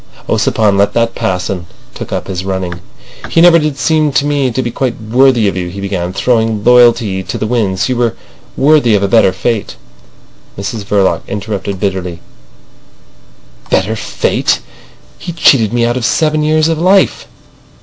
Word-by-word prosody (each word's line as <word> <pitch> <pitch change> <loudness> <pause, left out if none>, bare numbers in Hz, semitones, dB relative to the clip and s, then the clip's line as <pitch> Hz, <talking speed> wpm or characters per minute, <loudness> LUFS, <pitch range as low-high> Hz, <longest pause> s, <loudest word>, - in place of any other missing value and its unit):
Ossipon 105 -3 +1
let 100 0 +2
that 115 0 0
pass, 90 0 -2
and 90 -3 -5 0.3
took - - -8
up - - -3
his 90 -1 -5
running. 95 -2 -4 0.5
"He - - +1
never 170 0 +6
did 150 -3 -2
seem 155 +1 +1
to 140 - +1
me 145 -3 0
to 130 +2 -2
be 120 - -3
quite 125 0 -3
worthy 120 0 +2
of 100 - -1
you," 90 -1 -3
he 100 +3 -8
began, 95 -3 -3
throwing 110 0 0
loyalty 120 -5 +4
to 90 - -5
the - - -3
winds. 105 -5 0
"You 130 -2 -1
were 120 -2 0 0.4
worthy 140 -6 +3
of 100 - 0
a - - +2
better 100 -2 +4
fate." 110 +4 -3 0.8
Mrs 100 +1 -5
Verloc 100 -2 +1
interrupted 100 -1 -4
bitterly: 95 -3 -3 1.5
"Better 100 +4 0
fate! 105 - -1 0.6
He 175 - -6
cheated 130 -10 +3
me 120 0 +1
out 120 +1 -1
of 125 - -4
seven 155 +4 +1
years 155 +1 +2
of 165 -1 -1
life." 190 +3 +2
110 Hz, 170 wpm, -13 LUFS, 95-130 Hz, 1.5 s, never